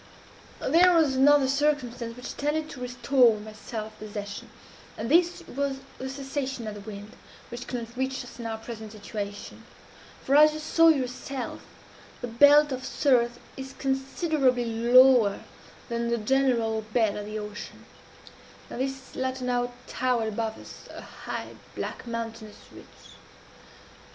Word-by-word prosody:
"There 345 Hz, +5 st, +5 dB
was 305 Hz, -5 st, +3 dB
another 280 Hz, +1 st, +5 dB
circumstance 260 Hz, -5 st, -1 dB
which 250 Hz, -, -7 dB
tended 305 Hz, +2 st, -1 dB
to 255 Hz, -, -9 dB
restore 250 Hz, -2 st, +3 dB
my 215 Hz, +1 st, -10 dB
self 215 Hz, 0 st, -7 dB
possession; 205 Hz, -1 st, -7 dB, 0.5 s
and 230 Hz, +4 st, -3 dB
this 345 Hz, +2 st, +3 dB
was 275 Hz, 0 st, -2 dB, 0.2 s
the 265 Hz, -, -4 dB
cessation 270 Hz, -2 st, -4 dB
of 215 Hz, -, -4 dB
the 205 Hz, -, -8 dB
wind, 205 Hz, 0 st, -9 dB, 0.4 s
which 240 Hz, +1 st, -7 dB
could 245 Hz, -2 st, -3 dB
not 235 Hz, -, -18 dB
reach 265 Hz, +1 st, -2 dB
us 245 Hz, -, -13 dB
in 235 Hz, -, -4 dB
our 225 Hz, -1 st, -3 dB
present 220 Hz, -1 st, -8 dB
situation 205 Hz, -1 st, -7 dB, 0.6 s
for, 275 Hz, -, +2 dB
as 305 Hz, +1 st, +7 dB
you 310 Hz, -, -5 dB
saw 330 Hz, +2 st, +4 dB
yourself, 260 Hz, -3 st, -1 dB, 0.6 s
the 245 Hz, -, -4 dB
belt 285 Hz, +5 st, +6 dB
of 260 Hz, 0 st, -4 dB
surf 240 Hz, -4 st, +2 dB, 0.2 s
is 265 Hz, 0 st, -8 dB
considerably 270 Hz, -1 st, 0 dB
lower 235 Hz, -1 st, +5 dB, 0.5 s
than 235 Hz, -1 st, -2 dB
the 235 Hz, -, +1 dB
general 230 Hz, -2 st, +1 dB
bed 220 Hz, -1 st, 0 dB
of 210 Hz, 0 st, -5 dB
the 215 Hz, +1 st, -4 dB
ocean, 210 Hz, 0 st, -8 dB, 0.9 s
and 250 Hz, -, -4 dB
this 270 Hz, 0 st, -5 dB
latter 260 Hz, 0 st, -2 dB
now 245 Hz, 0 st, 0 dB
towered 245 Hz, -3 st, 0 dB
above 220 Hz, 0 st, -3 dB
us, -, -, -12 dB
a -, -, -8 dB
high, -, -, -7 dB, 0.3 s
black, -, -, -5 dB
mountainous 225 Hz, -2 st, -6 dB
ridge. -, -, -13 dB
250 Hz, 145 wpm, -27 LUFS, 225-270 Hz, 0.9 s, as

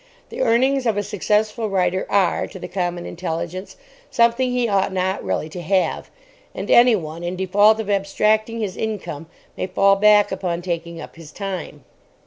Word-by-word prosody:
The 485 Hz, -, -5 dB
earnings 260 Hz, -, +2 dB
of 215 Hz, -3 st, +1 dB
a 205 Hz, -, 0 dB
successful 210 Hz, +2 st, 0 dB
writer 185 Hz, -1 st, 0 dB
are, 195 Hz, -4 st, +1 dB
to -, -, -10 dB
the -, -, -7 dB
common 175 Hz, -1 st, -3 dB
intelligence, 175 Hz, +2 st, -5 dB, 0.3 s
something 235 Hz, +2 st, +2 dB
he 245 Hz, -1 st, 0 dB
ought 195 Hz, -3 st, +1 dB
not 190 Hz, 0 st, -1 dB
really 95 Hz, +10 st, -2 dB
to 175 Hz, +3 st, -7 dB
have. 185 Hz, +3 st, 0 dB, 0.5 s
And -, -, -4 dB
anyone, 175 Hz, -10 st, +4 dB
in 175 Hz, +1 st, -3 dB
default 205 Hz, +4 st, +3 dB
of 220 Hz, -, -4 dB
abstracting 215 Hz, +3 st, +1 dB
his 200 Hz, -4 st, -3 dB
income, 190 Hz, -8 st, -5 dB, 0.3 s
may -, -, -3 dB
fall 195 Hz, +1 st, +3 dB
back 210 Hz, 0 st, +5 dB
upon 175 Hz, -2 st, -3 dB
taking 170 Hz, -1 st, -4 dB
up 165 Hz, -, -10 dB
his 160 Hz, -2 st, -12 dB
time. 185 Hz, -7 st, -6 dB
195 Hz, 165 wpm, -21 LUFS, 175-215 Hz, 0.5 s, back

